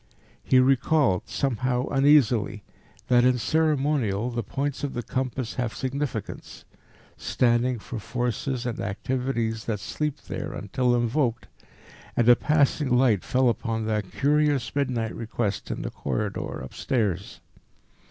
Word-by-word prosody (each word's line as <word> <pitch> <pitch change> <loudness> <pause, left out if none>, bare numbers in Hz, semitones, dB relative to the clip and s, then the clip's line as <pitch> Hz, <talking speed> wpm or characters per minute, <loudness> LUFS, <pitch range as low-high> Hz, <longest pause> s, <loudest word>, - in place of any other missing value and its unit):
He 130 - +3
recalled, 130 - +3
somehow 125 -1 0
uneasily, 135 -7 +3 0.4
that 120 -1 +5
in 125 0 +4
ceremonial 135 -7 +1
the 120 0 -2
points 140 +7 -3
of 140 - -3
the 120 - -3
compass 130 0 -3
have 115 -2 -3
significance, 135 +1 -4 0.5
standing 120 +1 +1
for 115 +2 -7
forces 125 +3 -2
and 120 -3 -3
activities 115 +1 -2
that 110 -3 -2
sleep 150 +7 -3
there - - -5
until 120 +5 0
invoked, 120 0 0 0.7
and 120 - +3
a 120 - +9
passing 150 -1 +2
light 120 -7 +3
fell 130 0 +2
upon 115 -1 -1
that 105 -3 -2
curious 145 -3 +1
midnight 125 -6 -1
request 110 -4 -3
in - - -3
the - - -4
corridor 105 -2 -3
upstairs. 100 -7 -2
125 Hz, 125 wpm, -26 LUFS, 115-135 Hz, 0.7 s, a